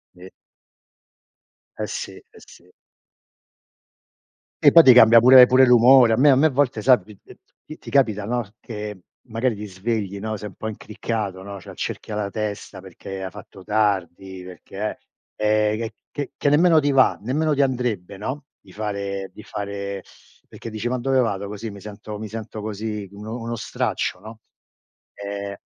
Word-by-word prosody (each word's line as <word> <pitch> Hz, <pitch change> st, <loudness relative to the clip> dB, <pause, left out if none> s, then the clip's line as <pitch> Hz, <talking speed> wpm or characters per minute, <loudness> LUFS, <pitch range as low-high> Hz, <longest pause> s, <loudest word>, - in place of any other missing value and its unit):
Ve 90 Hz, +1 st, -13 dB, 1.5 s
Eh -, -, -2 dB
sì, -, -, -5 dB
eh -, -, -16 dB, 0.2 s
sì. 90 Hz, +1 st, -19 dB, 1.9 s
E -, -, +8 dB
poi 165 Hz, -, +8 dB
ti 130 Hz, -, +8 dB
cambia 115 Hz, -1 st, +8 dB
pure 125 Hz, +1 st, +8 dB
pure 130 Hz, +1 st, +5 dB
l'umore, 125 Hz, -1 st, +6 dB
a -, -, +1 dB
me 145 Hz, +3 st, +5 dB
a 135 Hz, -, +6 dB
me 145 Hz, +4 st, +3 dB
a -, -, +5 dB
volte 130 Hz, -5 st, 0 dB
sai 125 Hz, -2 st, +6 dB
t 105 Hz, -, -15 dB
t -, -, -15 dB, 0.3 s
ti 155 Hz, -, -10 dB
ti -, -, -11 dB
capita 110 Hz, -7 st, +2 dB
no, 120 Hz, +2 st, -1 dB, 0.2 s
che 105 Hz, -2 st, -7 dB, 0.3 s
magari 115 Hz, +1 st, -1 dB
ti 105 Hz, +1 st, -7 dB
svegli, 100 Hz, 0 st, -3 dB
no, 110 Hz, +1 st, -4 dB
sei 105 Hz, +1 st, -7 dB
un -, -, -17 dB
po' 110 Hz, -, -6 dB
incriccato 105 Hz, -2 st, -5 dB
no, 100 Hz, +1 st, -8 dB
c'hai -, -, -12 dB
il -, -, -15 dB
cerchio 110 Hz, -, -5 dB
alla 105 Hz, -1 st, -2 dB
testa 105 Hz, -2 st, -5 dB
perché 95 Hz, +1 st, -9 dB
hai 95 Hz, -, -5 dB
fatto 95 Hz, -2 st, -13 dB
tardi, 95 Hz, -3 st, -1 dB
perché 95 Hz, +4 st, -6 dB, 0.4 s
eh 105 Hz, 0 st, +2 dB
ehm, 115 Hz, -, -2 dB
c -, -, -12 dB, 0.2 s
che 145 Hz, -2 st, -5 dB
che 145 Hz, -, +1 dB
nemmeno 160 Hz, +2 st, +5 dB
ti 145 Hz, -1 st, +1 dB
va, 135 Hz, -1 st, +4 dB
nemmeno 150 Hz, +6 st, 0 dB
ti 140 Hz, -, +3 dB
andrebbe, 120 Hz, -8 st, -2 dB
no, 130 Hz, +8 st, -5 dB, 0.2 s
di 95 Hz, -, -19 dB
fare 100 Hz, -2 st, -4 dB
di -, -, -11 dB
fare 100 Hz, -2 st, -6 dB, 0.4 s
perché 115 Hz, -, -9 dB
dici: 110 Hz, +1 st, -4 dB
"Ma 125 Hz, 0 st, -2 dB
dove 135 Hz, +2 st, +1 dB
vado 100 Hz, -4 st, -2 dB
così, 105 Hz, +2 st, -6 dB
mi 100 Hz, -, -11 dB
sento 105 Hz, 0 st, -9 dB
mi 110 Hz, -, -6 dB
sento 110 Hz, 0 st, -7 dB
così 105 Hz, -1 st, -5 dB
uno 110 Hz, +4 st, -7 dB
uno 115 Hz, 0 st, -4 dB
straccio, 105 Hz, -, -3 dB
no." 110 Hz, +3 st, -12 dB, 0.8 s
Ehm, 100 Hz, 0 st, -6 dB
110 Hz, 180 wpm, -22 LUFS, 100-125 Hz, 1.9 s, E